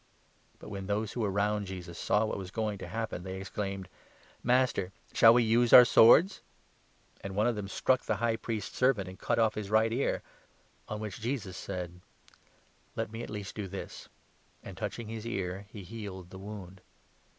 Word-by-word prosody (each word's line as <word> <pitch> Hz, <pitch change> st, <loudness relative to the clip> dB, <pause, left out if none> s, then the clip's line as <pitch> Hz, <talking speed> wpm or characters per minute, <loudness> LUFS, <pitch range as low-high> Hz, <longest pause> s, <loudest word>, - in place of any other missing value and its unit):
" -, -, -35 dB
But -, -, -10 dB
when 100 Hz, -2 st, -6 dB
those 105 Hz, +1 st, -1 dB
who -, -, -6 dB
were 105 Hz, -3 st, +1 dB
round 100 Hz, +1 st, 0 dB
Jesus 90 Hz, -2 st, -7 dB
saw 105 Hz, +2 st, +2 dB
what 110 Hz, -, -3 dB
was 95 Hz, -2 st, -6 dB
going 105 Hz, -1 st, -2 dB
to -, -, -6 dB
49 115 Hz, -, -5 dB
happen, 110 Hz, -6 st, -4 dB
they 95 Hz, 0 st, -5 dB
exclaimed: 95 Hz, -1 st, -4 dB, 0.3 s
" -, -, -27 dB
Master, 120 Hz, -6 st, +2 dB, 0.2 s
shall 115 Hz, -, +8 dB
we 120 Hz, +1 st, +5 dB
use 115 Hz, +1 st, +3 dB
our 125 Hz, -, +12 dB
swords? 155 Hz, -, +6 dB, 0.4 s
" -, -, -33 dB
And 100 Hz, -1 st, -5 dB
one 105 Hz, +2 st, +2 dB
of 120 Hz, -1 st, +2 dB
them 105 Hz, -1 st, -4 dB
struck 130 Hz, +5 st, +1 dB
the 110 Hz, -, -1 dB
High 115 Hz, +2 st, 0 dB
Priest's 110 Hz, -3 st, -4 dB
servant 125 Hz, -7 st, +2 dB
and 95 Hz, 0 st, -10 dB
cut -, -, 0 dB
off 110 Hz, -2 st, +3 dB
50 -, -, -4 dB
his 100 Hz, -2 st, -6 dB
right 110 Hz, +1 st, +3 dB
ear; 135 Hz, +4 st, 0 dB, 0.6 s
on 105 Hz, 0 st, -5 dB
which 105 Hz, 0 st, -6 dB
Jesus 115 Hz, -6 st, -3 dB
said: 90 Hz, -2 st, -6 dB, 0.5 s
" -, -, -35 dB
Let -, -, -3 dB
me 115 Hz, +1 st, -6 dB
at -, -, -6 dB
least 105 Hz, -2 st, -6 dB
do 105 Hz, -2 st, -5 dB
this 95 Hz, +1 st, -8 dB, 0.2 s
"; -, -, -36 dB
51 -, -, -8 dB
and, -, -, -10 dB
touching 120 Hz, -2 st, -4 dB
his 110 Hz, 0 st, -6 dB
ear, 95 Hz, -3 st, -3 dB
he 105 Hz, -2 st, -9 dB
healed 95 Hz, -3 st, -8 dB
the 95 Hz, -, -9 dB
wound. 95 Hz, -2 st, -9 dB
105 Hz, 215 wpm, -30 LUFS, 95-115 Hz, 0.6 s, our